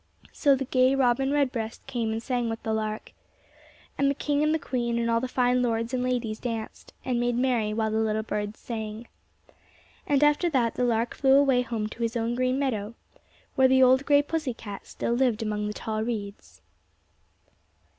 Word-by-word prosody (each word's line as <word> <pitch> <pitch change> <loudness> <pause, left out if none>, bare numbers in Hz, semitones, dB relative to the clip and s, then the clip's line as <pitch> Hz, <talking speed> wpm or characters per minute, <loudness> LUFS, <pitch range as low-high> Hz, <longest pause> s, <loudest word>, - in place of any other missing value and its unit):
So 280 -2 +3
the 270 0 -3
gay 255 +1 +3
robin 270 0 +2
redbreast 255 -6 -1
came 240 -4 -2
and 225 +1 -3
sang 245 -2 -1
with 225 0 -5
the 220 - -1
lark. 215 0 -3 0.9
And 275 0 +3
the 280 - 0
king 290 +1 0
and 305 0 +2
the 320 - +2
queen 240 -5 -2
and 235 0 0
all 230 - +3
the 260 - -2
fine 250 0 +2
lords 230 0 -1
and 255 - 0
ladies 245 -4 -2
danced 225 -3 -6
and 250 -2 0
made 240 0 0
merry 245 -4 +1
while 220 0 -1
the 220 - 0
little 220 0 0
birds 210 0 -4
sang. 220 0 -6 1.0
And 285 0 +3
after 295 +4 +3
that 245 -7 +1
the 250 - 0
lark 230 0 0
flew 270 -1 +4
away 275 -3 +4
home 230 -3 -3
to 230 - -10
his 230 +1 -1
own 230 +1 -1
green 255 +1 0
meadow, 235 -6 -2 0.6
where 265 -1 +5
the 260 0 +5
old 260 +1 +5
gray 285 0 +5
pussy 305 -5 -3
cat 205 -3 -9
still 235 - -2
lived 240 -3 +1
among 210 -1 -2
the - - -2
tall 215 0 -3
reeds. 215 -3 -6
240 Hz, 195 wpm, -26 LUFS, 220-260 Hz, 1.0 s, where